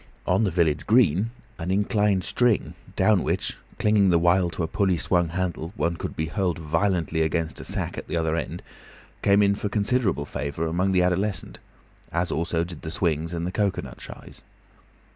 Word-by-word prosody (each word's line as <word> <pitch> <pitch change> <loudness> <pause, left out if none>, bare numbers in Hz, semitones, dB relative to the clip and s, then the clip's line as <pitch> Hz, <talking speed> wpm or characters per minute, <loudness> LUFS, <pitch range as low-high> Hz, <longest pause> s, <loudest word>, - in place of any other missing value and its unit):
On 115 - +2
the - - +1
village 80 -4 +1
green 110 - +4 0.3
an 85 +1 -4
inclined 100 -1 +2
strong 120 0 +2
[rope?], - - -10 0.2
down 105 -5 +4
which, - - -1 0.2
clinging 105 -2 +3
the 85 - +5
while 85 +1 +3
to 85 0 -4
a - - 0
pulley 95 0 +1
swung 85 0 +1
handle, 85 0 -3
one 85 -4 0
could - - -5
be 80 - -1
hurled 90 +2 -1
violently 80 +1 0
against 80 0 -1
a - - -7
sack - - -3
at - - -10
the - - -2
other 80 -1 0
end, 85 - -4 0.6
came 100 +1 +4
in 100 0 +4
for 105 0 -3
considerable 100 - +1
favour 75 +3 -3
among 90 +4 0
the 90 -1 +3
adolescents, 90 +2 -1 0.5
as 85 +1 0
also 85 +1 0
did 85 -2 -8
the 80 - -5
swings 80 -1 -1
and 85 -1 -3
the 90 - -2
cocoanut 100 0 -2
shies. - - -11
90 Hz, 185 wpm, -25 LUFS, 80-100 Hz, 0.6 s, the